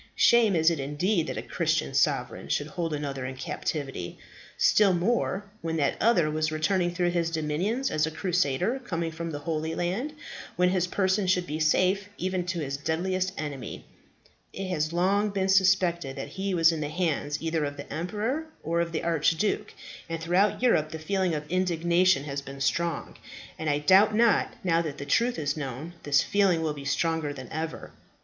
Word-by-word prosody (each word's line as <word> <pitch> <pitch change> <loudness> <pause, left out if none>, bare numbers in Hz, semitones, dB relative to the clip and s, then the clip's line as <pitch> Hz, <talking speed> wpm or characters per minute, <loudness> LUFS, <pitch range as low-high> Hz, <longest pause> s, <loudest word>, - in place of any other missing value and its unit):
Shame 230 -5 +5
is 160 +1 +4
it 165 - -2
indeed 155 +6 0
that - - -4
a - - -3
Christian - - -1
sovereign - - 0
should 145 - 0
hold 165 +2 -3
another 140 -3 -3
in 130 +1 -5
captivity. 135 - -4 0.4
Still 205 -3 +4
more, 200 +1 0 0.2
when 165 0 -2
that 140 -3 +1
other 175 -10 +3
was 155 0 0
returning 175 +3 +1
through 175 0 0
his 170 -1 0
dominions 170 - -1
as 155 0 +1
a - - -1
crusader 180 - 0
coming 170 -9 -3
from 165 +1 -5
the 150 - -4
Holy 160 +1 -3
Land, 200 +13 -2 0.4
when 180 0 +3
his 180 -1 +1
person 190 +1 +1
should 180 -1 +2
be 155 -1 -4
safe, 185 +5 +2
even 185 -1 -2
to 175 -2 -2
his 140 -1 -3
deadliest 185 +5 -1
enemy. 145 -5 -6 0.7
It 195 -1 -5
has 155 -3 -1
long 195 +5 +2
been 195 -1 -1
suspected 185 -6 +3
that 135 - -6
he 195 0 -2
was 165 -1 +5
in 160 -2 -3
the 145 - -2
hands 155 -3 -1
either 160 -1 -1
of 145 0 -3
the 140 - -8
emperor, 220 - -2 0.2
or 170 +1 0
of 170 -1 -3
the 160 - -2
archduke, 165 +4 +1 0.4
and 165 0 -3
throughout 180 +8 +1
Europe 155 -11 +3
the 160 - -6
feeling 185 +1 0
of 150 - -3
indignation 175 -1 +2
has 140 -1 -4
been 140 0 -9
strong; 170 +5 -1 0.4
and 160 - -1
I 145 - +2
doubt 190 +8 +5
not, 230 -1 +3
now 170 -2 +2
that 155 -4 -5
the 140 - -6
truth 235 +11 +2
is 145 -2 -1
known, 145 +3 -5
this 140 -1 +3
feeling 190 -5 +2
will 155 -2 0
be 140 -1 -9
stronger 160 +1 0
than 130 -3 -9
ever." 160 0 -5
170 Hz, 185 wpm, -27 LUFS, 150-185 Hz, 0.7 s, Shame